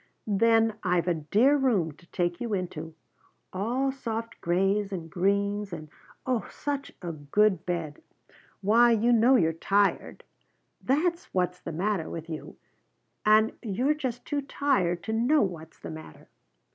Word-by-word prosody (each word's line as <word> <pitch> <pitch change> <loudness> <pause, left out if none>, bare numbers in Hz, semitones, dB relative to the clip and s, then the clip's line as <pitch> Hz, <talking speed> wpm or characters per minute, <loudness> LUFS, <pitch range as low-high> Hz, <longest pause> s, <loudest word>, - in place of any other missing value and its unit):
Then 225 +1 +3
I've 180 -2 +1
a 175 - +3
dear 210 - +3
room 230 - +1
to 165 +4 -20
take 175 -1 -2
you 230 -4 -1
into, 165 -4 -5 0.6
all 245 +8 0
soft 230 -3 -5
grays 195 +4 +1
and 165 -4 -6
greens, 200 +2 0
and 155 -3 -7 0.4
oh, 250 -5 -1
such 285 -1 -4
a 175 - -3
good 165 +6 +1
bed! 165 -4 -3 0.6
Why 230 +5 +5
you 230 +2 +3
know 235 +3 +5
you're 165 -8 +3
tired! 200 +5 0 0.6
That's 335 +6 0
what's 180 -1 0
the - - -6
matter 185 +1 -1
with 165 0 -7
you, 155 - -7 0.7
and 215 +1 +5
you're 245 +7 +1
just 255 -5 -4
too 290 -1 -1
tired 255 -11 0
to 220 - -3
know 245 +6 +3
what's 165 -4 -5
the - - -8
matter." 155 - -11
200 Hz, 145 wpm, -27 LUFS, 175-235 Hz, 0.7 s, Why